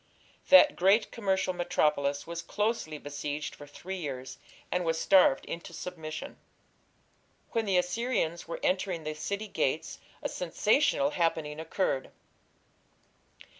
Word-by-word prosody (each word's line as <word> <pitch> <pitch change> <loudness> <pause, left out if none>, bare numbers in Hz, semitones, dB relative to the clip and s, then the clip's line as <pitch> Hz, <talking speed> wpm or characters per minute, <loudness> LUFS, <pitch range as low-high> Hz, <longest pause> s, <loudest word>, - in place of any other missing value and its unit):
That 285 +1 +8
great 200 +4 +3
commercial 190 -4 0
metropolis 150 -5 +1
was 170 0 -5
closely 205 -4 -2
besieged 145 +1 -4
for 145 - -12
three 185 +6 -7
years, 130 -6 -6 0.3
and 180 0 +1
was 165 -1 0
starved 185 -8 +5
into 170 0 -7
submission. 160 -2 -6 1.1
When 230 -1 0
the 195 -3 +2
Assyrians 180 -2 -1
were 170 - -5
entering 185 -3 0
the 155 0 -3
city 200 +8 -4
gates 160 -4 -1 0.2
a - - +1
sensational 275 - +2
happening 160 -3 -1
occurred. 160 -4 -1
170 Hz, 120 wpm, -29 LUFS, 155-195 Hz, 1.1 s, That